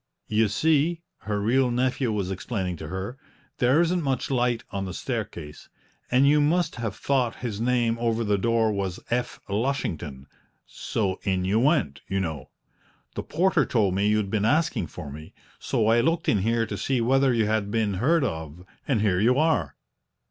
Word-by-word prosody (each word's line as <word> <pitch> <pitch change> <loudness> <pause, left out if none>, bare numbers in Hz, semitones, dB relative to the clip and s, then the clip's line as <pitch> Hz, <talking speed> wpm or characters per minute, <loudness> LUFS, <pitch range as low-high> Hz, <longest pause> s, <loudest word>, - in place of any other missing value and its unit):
"You 110 +1 +3
see," 160 - +1 0.2
her 105 -1 0
real 125 +5 +2
nephew 125 0 0
was 100 -3 -2
explaining 95 -1 -3
to 80 - -7
her, 95 - -5 0.4
"there 130 +6 +4
isn't 175 +1 +1
much 135 -3 -1
light 120 -2 +1
on 100 -1 -3
the 95 -1 -6
staircase, 105 - -5 0.4
and 130 +3 +4
you 150 +1 +5
must 160 +1 +1
have 115 -4 -3
thought 130 -3 0
his 110 -3 -3
name 120 -1 +1
over 115 -1 0
the 105 -2 +1
door 115 +1 +2
was 95 -3 -3
'F. 120 +1 -1
Lushington,' 85 - -2 0.4
so 95 -4 -3
in 95 -2 0
you 100 +4 +2
went, 130 - +1
you 95 - -1
know! 80 -8 -4 0.6
The - - -3
porter 175 -1 +2
told 105 -7 +1
me 100 +2 +1
you'd 105 -2 +1
been 105 -2 0
asking 150 - +1
for 75 -2 -8
me, 75 +2 -11 0.2
so 110 - 0
I 115 +2 +4
looked 165 +6 0
in 105 - +3
here 115 +3 +1
to 105 -1 -5
see 130 +4 0
whether 135 +3 +3
you 115 -3 +2
had 105 -1 0
been 110 -2 0
heard 140 - +2
of, 80 - -5 0.2
and 125 -7 +1
here 95 -4 +2
you 120 +5 +3
are." 160 +2 +1
115 Hz, 180 wpm, -25 LUFS, 95-130 Hz, 0.6 s, you